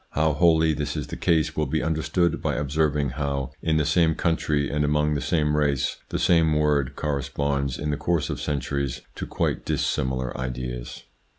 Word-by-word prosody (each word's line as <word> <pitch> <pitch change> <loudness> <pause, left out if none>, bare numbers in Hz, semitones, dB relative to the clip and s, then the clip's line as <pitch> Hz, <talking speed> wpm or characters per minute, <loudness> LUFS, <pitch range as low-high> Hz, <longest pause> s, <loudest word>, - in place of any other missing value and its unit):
How 80 +1 +2
wholly 80 0 +4
this 75 +1 -3
is 75 - -2
the - - -7
case 80 -3 +1
will 75 -2 0
be 80 +3 -1
understood 80 +2 0
by - - -1
observing 75 0 0
how 70 -2 -2
in 80 -1 +1
the 75 - +2
same 80 0 +3
country, 75 -4 0
and 75 +1 0
among 75 +1 +2
the 70 - -1
same 75 -3 +1
race, 75 -3 +1
the - - -2
same 85 -3 +3
word 70 -3 +1
corresponds 70 -2 -1
in 75 +1 -2
the 70 - -1
course 85 -3 0
of - - -4
centuries 70 -2 -2
to - - -6
quite - - -1
dissimilar 65 -1 -1
ideas. 60 -1 -5
75 Hz, 180 wpm, -25 LUFS, 70-80 Hz, -, wholly